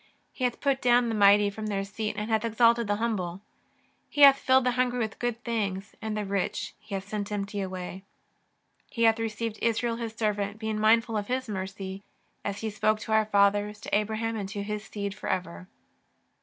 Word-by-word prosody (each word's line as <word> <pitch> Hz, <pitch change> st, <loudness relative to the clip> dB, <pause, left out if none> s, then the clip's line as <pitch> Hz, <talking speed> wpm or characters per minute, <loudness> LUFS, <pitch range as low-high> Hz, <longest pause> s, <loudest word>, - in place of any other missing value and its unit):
He 255 Hz, -, -2 dB
hath 245 Hz, -, -1 dB
put 275 Hz, -1 st, +1 dB
down 245 Hz, -1 st, +4 dB
the -, -, -1 dB
mighty 205 Hz, -1 st, +5 dB
from 215 Hz, +1 st, -5 dB
their 200 Hz, -2 st, -1 dB
seat 210 Hz, +2 st, -4 dB
and 210 Hz, +2 st, -3 dB
hath 220 Hz, 0 st, +2 dB
exalted 230 Hz, 0 st, +3 dB
the 205 Hz, -, +1 dB
humble. 200 Hz, -6 st, -2 dB, 0.7 s
He 290 Hz, -, -2 dB
hath 275 Hz, -1 st, +9 dB
filled 260 Hz, 0 st, +4 dB
the 250 Hz, -, +2 dB
hungry 250 Hz, 0 st, 0 dB
with 220 Hz, -2 st, -3 dB
good 240 Hz, 0 st, -2 dB
things, 200 Hz, -4 st, -2 dB
and 220 Hz, -1 st, -3 dB
the 210 Hz, -, -2 dB
rich 195 Hz, -2 st, -2 dB
He 210 Hz, -1 st, -7 dB
hath 195 Hz, 0 st, -5 dB
sent 205 Hz, 0 st, -4 dB
empty 205 Hz, 0 st, -3 dB
away. 185 Hz, 0 st, -5 dB, 0.9 s
He 230 Hz, -, -1 dB
hath 225 Hz, 0 st, +5 dB
re 225 Hz, 0 st, 0 dB
ceived 220 Hz, 0 st, -4 dB
Israel 230 Hz, 0 st, 0 dB
His 230 Hz, -2 st, -4 dB
servant, 205 Hz, -2 st, -1 dB
being 220 Hz, -1 st, -3 dB
mindful 225 Hz, +1 st, +3 dB
of 205 Hz, -1 st, -3 dB
His 255 Hz, +1 st, -2 dB
mercy. 190 Hz, -1 st, -5 dB, 0.4 s
As 200 Hz, 0 st, -4 dB
He 220 Hz, -1 st, -2 dB
spoke 215 Hz, +1 st, +1 dB
to 220 Hz, -, -6 dB
our 220 Hz, 0 st, +4 dB
fathers, 205 Hz, 0 st, +2 dB
to -, -, -1 dB
Abraham 220 Hz, +2 st, -1 dB
and 200 Hz, -3 st, -4 dB
to 200 Hz, 0 st, -4 dB
his 210 Hz, 0 st, -4 dB
seed 200 Hz, -1 st, -4 dB
for 205 Hz, -, -6 dB
ever." 90 Hz, -, -3 dB
215 Hz, 205 wpm, -28 LUFS, 200-230 Hz, 0.9 s, hath